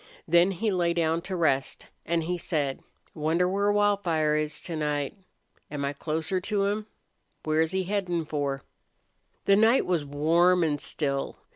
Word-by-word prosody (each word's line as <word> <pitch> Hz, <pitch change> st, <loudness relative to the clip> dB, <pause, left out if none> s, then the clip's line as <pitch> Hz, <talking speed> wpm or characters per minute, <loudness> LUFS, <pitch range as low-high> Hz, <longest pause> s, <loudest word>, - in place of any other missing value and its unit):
Then 170 Hz, +3 st, +5 dB
he 205 Hz, +3 st, -1 dB
lay 175 Hz, -2 st, +1 dB
down 165 Hz, 0 st, +1 dB
to 185 Hz, +2 st, -4 dB
rest, 140 Hz, -6 st, 0 dB, 0.2 s
and 170 Hz, 0 st, +1 dB
he 175 Hz, +3 st, -1 dB
said: 150 Hz, -6 st, -2 dB, 0.3 s
"Wonder 160 Hz, +4 st, +1 dB
where 200 Hz, +2 st, +1 dB
Wildfire 195 Hz, -7 st, +2 dB
is 155 Hz, 0 st, -2 dB
to 170 Hz, -, -5 dB
night? 150 Hz, +1 st, -2 dB, 0.5 s
Am 145 Hz, -2 st, -3 dB
I 140 Hz, -, -2 dB
closer 160 Hz, +5 st, -2 dB
to 200 Hz, 0 st, 0 dB
him? 210 Hz, +1 st, -2 dB, 0.6 s
Where's 160 Hz, +1 st, +1 dB
he 190 Hz, +1 st, -1 dB
headin' 180 Hz, -4 st, -1 dB
for?" 140 Hz, -3 st, -2 dB, 0.8 s
The 200 Hz, -, +5 dB
night 225 Hz, +5 st, +4 dB
was 175 Hz, -4 st, 0 dB
warm 165 Hz, +5 st, +3 dB
and 145 Hz, -3 st, 0 dB
still. 140 Hz, -3 st, -2 dB
170 Hz, 155 wpm, -27 LUFS, 150-190 Hz, 0.8 s, Then